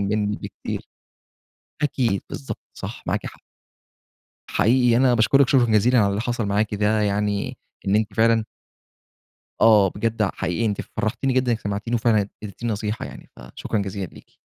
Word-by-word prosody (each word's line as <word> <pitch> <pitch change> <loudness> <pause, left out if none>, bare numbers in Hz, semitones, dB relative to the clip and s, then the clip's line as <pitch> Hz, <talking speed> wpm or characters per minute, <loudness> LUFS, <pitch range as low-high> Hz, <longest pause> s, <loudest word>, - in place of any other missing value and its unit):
مِنّي 105 +1 0
بكتير. - - -6 0.9
أكيد 125 -9 +1
بالضبط، 70 - -6
صح، - - -7
معاكِ - - -1
حق. - - -9 1.1
حقيقي 120 +3 +3
أنا 125 0 +4
باشكرِك 130 +4 +4
شكرًا 130 -3 +5
جزيلًا 115 +2 +3
على 105 -3 +4
اللي 100 +1 -1
حصل 120 -1 -2
معاكِ 105 +1 0
ده، 105 +1 +2
يعني 100 0 -1 0.3
إن 95 - +3
أنتِ 110 -2 -1
فعلًا 115 +1 +3 1.2
آه، 105 -3 +6
بجد 115 +1 -1
ع 100 - +2
حقيقي 95 +5 -1
أنتِ 105 -2 -1 0.2
فرحتيني 120 +4 0
جدًا 130 -1 +2
إنِك 110 - -2
سمعتيني، 100 +4 -3
و - - +3
فعلًا 110 -3 +2
إديتيني 110 +3 -4
نصيحة 105 +1 -3
يعني، - - -12
فشكرًا 65 - -4
جزيلًا 100 -1 -3
ليكِ. - - -17
110 Hz, 155 wpm, -23 LUFS, 100-120 Hz, 1.2 s, آه